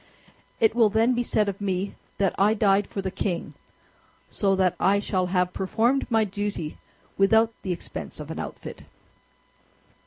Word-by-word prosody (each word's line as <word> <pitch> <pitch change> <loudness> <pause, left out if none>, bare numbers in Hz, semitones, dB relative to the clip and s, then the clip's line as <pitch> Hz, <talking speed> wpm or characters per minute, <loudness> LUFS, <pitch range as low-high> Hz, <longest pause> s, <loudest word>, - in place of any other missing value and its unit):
It 220 -1 +4
will 230 -2 +4
then 225 +4 +3
be 245 - 0
said 215 -3 +1
of 200 0 -4
me 195 0 -2 0.2
that 195 -2 +1
I 210 +3 +4
died 200 -1 +3
for 195 - -5
the 190 - -2
king; 180 -2 -3 0.8
so 195 -3 +1
that 185 -2 +2
I 200 +1 +3
shall 185 -2 -1
have 180 0 0
performed 235 +8 0
my 225 -2 +3
duty 205 -5 -4 0.4
without 220 +3 +4
the 185 - -3
expense 175 - -6
of 150 +1 -7
an - - -5
outfit." - - -7
200 Hz, 160 wpm, -25 LUFS, 185-220 Hz, 0.8 s, It